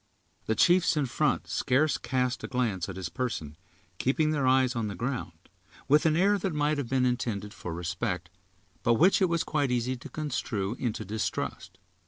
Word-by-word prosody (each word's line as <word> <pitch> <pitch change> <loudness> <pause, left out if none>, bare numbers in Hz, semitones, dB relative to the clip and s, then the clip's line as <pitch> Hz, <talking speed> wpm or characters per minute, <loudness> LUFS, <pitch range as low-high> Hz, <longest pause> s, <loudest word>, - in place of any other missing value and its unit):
The 110 - +1
chiefs 175 +1 +4
in 145 - +2
front 135 +3 0
scarce 140 +3 +1
cast 125 -1 -1
a - - -3
glance 110 -8 -1
at 95 - -6
his 95 -2 -4
person, 85 - -4 0.4
keeping 155 +4 +2
their 140 -4 +1
eyes 130 0 +3
on 115 -2 -1
the 100 - -5
ground, 120 -3 -3 0.5
with 150 +4 +5
an 155 - +3
air 200 +4 +3
that 180 -3 -2
might 150 0 +1
have 130 -5 -4
been 130 -1 +2
intended 105 -4 -2
for 90 - -7
respect, 90 +1 -3 0.5
but 120 -2 +3
which 185 - +4
it 185 - +4
was 170 -1 +1
quite 145 -3 0
easy 125 +1 0
to 125 - -10
construe 115 -9 -2
into 120 -5 -2
distrust. 95 -2 -3
125 Hz, 185 wpm, -28 LUFS, 105-150 Hz, 0.5 s, with